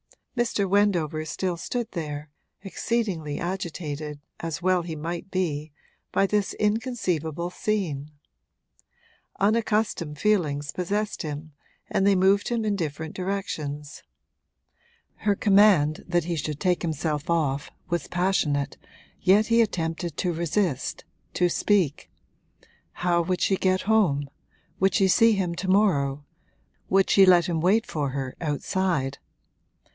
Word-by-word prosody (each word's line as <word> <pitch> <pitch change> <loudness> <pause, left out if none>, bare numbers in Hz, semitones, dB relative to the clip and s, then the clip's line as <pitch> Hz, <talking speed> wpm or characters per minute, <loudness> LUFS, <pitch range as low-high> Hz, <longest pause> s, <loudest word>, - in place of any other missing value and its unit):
Mr. 235 -5 0
Wendover 180 -6 +2
still 180 +3 -2
stood 235 +6 -3
there, 150 -3 -5 0.3
exceedingly 195 -7 -2
agitated, 155 -5 -4 0.2
as 165 -2 -4
well 185 0 +2
he 165 -1 -5
might 170 +4 -5
be, 155 -6 -2 0.4
by 195 - +3
this 205 0 0
inconceivable 185 - -1
scene. 170 -10 -2 1.3
Unaccustomed 210 -7 +1
feelings 150 -7 +1
possessed 205 +4 -2
him 155 0 -6 0.4
and 195 - +1
they 200 - +5
moved 195 +2 +3
him 235 -2 -1
in 210 -1 +1
different 160 -3 -4
directions. 155 -7 -4 1.2
Her 205 -1 +1
command 195 -8 +4
that 175 -1 +1
he 170 +1 -2
should 150 -1 -3
take 180 -2 +1
himself 155 -1 -2
off 145 -4 0 0.2
was 170 -4 -1
passionate, 150 -6 0 0.4
yet 205 +3 +4
he 230 0 +4
attempted 165 -5 -2
to 180 -2 0
resist, 170 -3 -1 0.3
to 180 - +3
speak. 180 -5 +1 0.8
How 175 -1 +1
would 180 +1 -1
she 195 - +3
get 185 0 +1
home 185 -10 +2 0.5
would 190 0 +3
she 195 - +4
see 230 +3 +5
him 185 -4 -1
to 185 +3 -4
morrow 150 -8 +2 0.6
would 195 0 +3
she 195 - +7
let 175 -2 +6
him 165 -2 -1
wait 210 +7 +3
for 145 - -2
her 130 -1 -4
outside? 150 -2 -1
175 Hz, 125 wpm, -25 LUFS, 155-200 Hz, 1.3 s, she